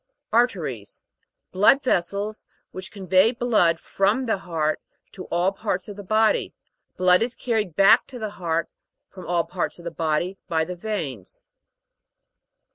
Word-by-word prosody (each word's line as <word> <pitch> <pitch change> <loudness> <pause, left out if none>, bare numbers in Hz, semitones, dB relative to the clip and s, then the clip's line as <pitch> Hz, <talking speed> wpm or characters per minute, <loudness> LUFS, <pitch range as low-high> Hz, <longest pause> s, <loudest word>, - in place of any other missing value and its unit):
AR'TERIES. 175 - 0 0.5
Blood 210 +9 +4
vessels, 200 -1 -1 0.2
which 185 0 -8
con 200 -2 -9
vey 185 +5 +5
blood 220 -9 +2
from 210 +7 0
the 220 -4 0
heart, 160 -4 -2 0.3
to 185 - -9
all 175 +3 +1
parts 195 -2 -3
of 205 - -8
the 205 - -8
body: 215 +2 +1 0.4
blood 180 +1 +4
is 235 +2 -1
carried 215 -9 -2
back 200 +6 +5
to 255 - -9
the 215 -3 -4
heart, 165 -4 -2 0.4
from 185 - -11
all 175 -1 +1
parts 175 +3 -4
of 170 - -14
the 170 - -3
body, 165 +4 -1
by 160 -1 0
the 180 +2 -6
veins. 165 - -5
185 Hz, 150 wpm, -24 LUFS, 170-215 Hz, 0.5 s, vey